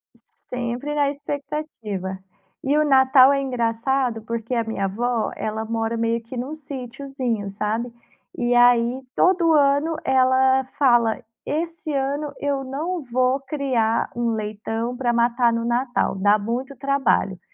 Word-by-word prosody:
S 235 - -25
sempre 250 +4 -3
na 290 -1 +2
expectativa. 275 -10 -5 0.4
E 280 +2 +2
o 305 - +3
Natal 265 0 +6
é 275 - +1
engraçado 245 -1 -1
porque 230 +2 -4
a 235 -1 +1
minha 220 -3 -2
avó, 230 +4 -1
ela 220 +1 -3
mora 225 0 -2
meio 230 0 0
que 230 +2 -9
num 260 +5 -4
sitiozinho, 260 -6 -4
sabe. 215 +4 -2 0.5
E 240 0 +1
aí, 245 +1 +4
todo 355 -3 +3
ano 290 +2 +3
ela 260 0 +4
fala: 240 -5 +3 0.2
"Esse 330 +1 -3
ano 285 +1 -1
eu 280 -1 -1
não 315 +7 -3
vou 255 0 +1
criar 265 -5 0
um 235 -1 0
leitão 220 +2 -3
para 245 -1 0
matar 235 0 +2
no 230 0 -1
Natal. 245 -2 0
Dá 205 +2 +3
muito 245 +6 -4
trabalho". 275 -9 +1
250 Hz, 140 wpm, -22 LUFS, 230-275 Hz, 0.5 s, Natal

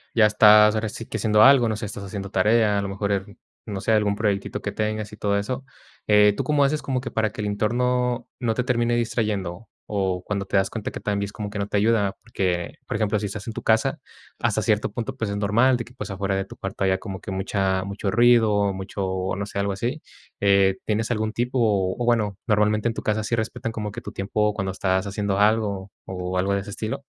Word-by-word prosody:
ya 115 -2 +6
estás 105 0 +7
ahora 110 0 -1
si 115 - -7
que 110 - -4
haciendo 105 0 +4
algo, 130 -3 +7
no 110 - -1
sé, 105 - -5
estás 105 0 -7
haciendo 100 0 -6
tarea, 105 +1 +3
a - - 0
lo 100 - -3
mejor, 100 +1 -2
al 100 0 -3 0.3
no 100 -3 -4
sé, 95 - -1
algún 105 -2 +2
proyectito 100 -2 -1
que - - -3
tengas 110 0 -3
y - - -9
todo 100 -1 0
eso, 125 +6 -3 0.4
eh, 105 -1 +6
¿tú - - -2
cómo 150 -2 +2
haces 150 +2 +1
como 130 -2 -1
que 125 - -6
para 110 -1 +1
que 105 - -7
el 105 - -2
entorno 125 +3 0
no 115 -2 0
te 125 - 0
termine 120 -1 +1
distrayendo? 110 -4 -2 0.3
O, 95 -3 -1
cuando 100 0 -3
te - - -4
das 95 0 +3
cuenta 110 -3 -4
que - - -7
también 100 -1 -1
es 100 - -9
como 105 -2 -5
que 105 0 -5
no 100 - -1
te - - -4
ayuda, 100 -2 +2
porque, 90 -6 -2
por - - -3
ejemplo, 105 -1 +1
si 105 - -3
estás 100 0 -5
en 115 - -4
tu - - -5
casa, 135 +7 +2 0.4
hasta - - +1
cierto - - +1
punto, 130 +3 -5
pues, 110 -5 -2
es 100 - -2
normal 110 +6 +3
de 120 - -3
que, 120 - -16
pues, 125 - -7
afuera 100 0 -2
de 95 - -2
tu - - -12
cuarto 95 0 -3
haya 95 0 +2
como 95 -1 -7
que - - -9
mucha 95 0 0
mucho 100 +1 -3
ruido, 110 -3 +4
mucho, 95 -1 -3
no 100 - -2
sé, 100 0 -5
algo 100 0 0
así, 120 +9 -3 0.4
eh, 100 -1 +4
¿tienes 110 +2 -1
algún 110 -1 -1
tip? 120 +2 -1
O 100 -6 +2
o, 120 - 0
bueno, 110 -5 +1
normalmente 105 0 +2
en 115 - 0
tu - - -5
casa 110 0 0
sí 115 - 0
respetan 115 0 -3
como 105 -2 -4
que - - -6
tu - - -8
tiempo 105 +2 0
cuando 100 -2 -2
estás 95 0 0
haciendo 100 -1 -1
algo, 105 -2 +1
o, 90 0 -4
algo 95 +2 +1
de 100 - 0
ese 100 - -9
estilo. 110 +7 -4
105 Hz, 245 wpm, -24 LUFS, 100-115 Hz, 0.4 s, estás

